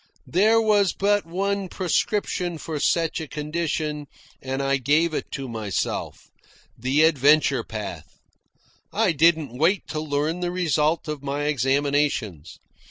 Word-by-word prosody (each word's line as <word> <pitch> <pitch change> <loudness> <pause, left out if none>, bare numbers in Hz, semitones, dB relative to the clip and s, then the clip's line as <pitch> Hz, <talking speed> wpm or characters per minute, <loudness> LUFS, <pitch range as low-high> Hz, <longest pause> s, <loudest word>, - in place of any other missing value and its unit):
There 215 +6 +3
was 210 -4 +3
but 205 -2 +1
one 195 +2 -2
prescription 180 -1 -1
for 155 -1 -5
such 165 +2 +1
a 160 - -6
condition, 150 -1 -3 0.3
and 135 +1 -3
I 135 0 +2
gave 150 +5 +2
it - - -3
to 135 -2 -4
myself 110 -6 -4 0.4
the 130 +6 +1
adventure 150 -2 +4
path. 105 -2 -7 0.7
I 215 -3 +2
didn't 155 -5 +2
wait 175 +5 +2
to 155 - -3
learn 155 +2 -1
the 175 -1 -1
result 165 -3 0
of 150 -2 -4
my 140 +1 -3
examinations. 140 - 0
155 Hz, 130 wpm, -24 LUFS, 140-175 Hz, 0.7 s, adventure